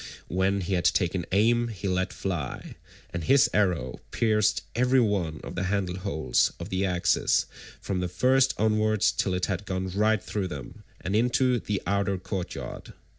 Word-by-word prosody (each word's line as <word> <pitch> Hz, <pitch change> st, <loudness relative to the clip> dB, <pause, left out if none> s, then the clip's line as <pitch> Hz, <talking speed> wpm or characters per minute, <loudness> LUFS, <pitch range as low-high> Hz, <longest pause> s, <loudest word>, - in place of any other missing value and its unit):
When 95 Hz, +2 st, +1 dB
he 95 Hz, +2 st, -2 dB
had 90 Hz, -1 st, 0 dB
taken 90 Hz, -2 st, +1 dB
aim 115 Hz, +4 st, +3 dB
he 100 Hz, -4 st, -5 dB
let 95 Hz, 0 st, 0 dB
fly, 85 Hz, -9 st, -4 dB, 0.4 s
and 85 Hz, -1 st, -4 dB
his 135 Hz, -, +5 dB
arrow 85 Hz, -12 st, 0 dB
pierced 110 Hz, -2 st, +1 dB
every 125 Hz, +3 st, +3 dB
one 95 Hz, -9 st, 0 dB
of -, -, -7 dB
the 95 Hz, -, -2 dB
handle 95 Hz, -2 st, -1 dB
holes 80 Hz, -4 st, +1 dB
of -, -, -6 dB
the 95 Hz, +1 st, -1 dB
axes 90 Hz, -2 st, +2 dB, 0.3 s
from 95 Hz, -2 st, -3 dB
the 90 Hz, -, -1 dB
first 130 Hz, +8 st, +3 dB
onwards 110 Hz, -1 st, +2 dB
till 95 Hz, -2 st, -1 dB
it 90 Hz, -, 0 dB
had 100 Hz, 0 st, -3 dB
gone 95 Hz, 0 st, -2 dB
right 105 Hz, +1 st, +1 dB
through 100 Hz, -3 st, -2 dB
them, 70 Hz, -7 st, -8 dB, 0.2 s
and 95 Hz, -, -2 dB
into 125 Hz, +2 st, +2 dB
the 105 Hz, -3 st, -3 dB
outer 100 Hz, 0 st, 0 dB
courtyard. 90 Hz, 0 st, -6 dB
95 Hz, 170 wpm, -27 LUFS, 90-110 Hz, 0.4 s, his